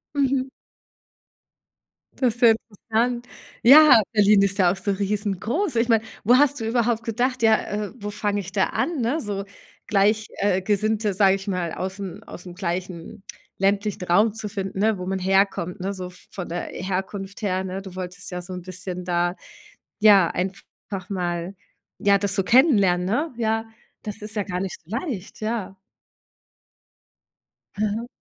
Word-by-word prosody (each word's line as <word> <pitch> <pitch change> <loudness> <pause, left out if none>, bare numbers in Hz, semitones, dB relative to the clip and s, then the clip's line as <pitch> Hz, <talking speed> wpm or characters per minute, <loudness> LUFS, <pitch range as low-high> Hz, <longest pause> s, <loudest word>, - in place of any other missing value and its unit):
Mhm. 270 -1 +1 1.7
Das 250 -4 +2
ist - - -11
sehr 235 -3 +7 0.4
interessant. 240 +2 0 0.4
Ja, 285 -1 +9
Berlin 210 -2 +5
ist 195 0 +1
ja 180 -3 +4
auch - - -2
so 195 +1 0
riesengroß. 205 - -1
Ich 230 +1 +2
meine, 225 -2 +3 0.2
wo 245 +4 +5
hast 285 0 +3
du 225 - -3
überhaupt 230 -1 +1
gedacht, 250 +2 -1
ja: 220 -1 +4 0.3
„Äh, - - -12
wo 205 -3 -5
fange 205 0 -1
ich 190 0 -9
da 195 -1 +2
an“, 330 -5 -2
ne? 245 +7 0
So 200 -2 -4 0.4
gleich 210 +2 +2
äh, 195 -2 +1
Gesinnte, 210 +1 0
sage 195 0 +4
ich 195 +1 -8
mal, 180 -4 -2
aus 190 +2 -5
'n 195 +1 -7
aus 180 - -11
'm 180 - -9
gleichen 180 0 -5 0.3
ländlichen 200 0 0
Raum 205 +5 +3
zu 215 -1 -5
finden, 195 -2 -4
ne, 215 0 +2
wo 180 - -6
man 190 +1 -2
herkommt, 190 -1 +1
ne, 195 +2 -3
so 185 -2 -6
v 180 - -16
von 185 -3 -6
der 175 +1 -3
Herkunft 195 +2 -4
her, 190 -2 0
ne? 190 +1 -5
Du 190 -2 -10
wolltest 180 -1 -7
ja 180 0 -4
so 180 +1 -8
'n 180 - -6
bisschen 180 0 -6
da, 175 0 0 0.6
ja, 205 -4 +7
einfach 190 +1 -6
mal, 175 -1 -3 0.4
ja, 200 0 +4
das 200 0 -1
so 195 - +1
kennenlernen, 200 - +4
ne? 270 - -1
Ja, 225 -1 0 0.4
das 210 0 -7
ist 210 +1 -7
ja 210 - 0
gar 180 -2 -4
nicht 190 0 -4
so 160 - -26
leicht, 240 - -6
ja. 215 -3 -3 2.0
Mhm. 215 +3 -1
200 Hz, 170 wpm, -23 LUFS, 185-225 Hz, 2.0 s, Ja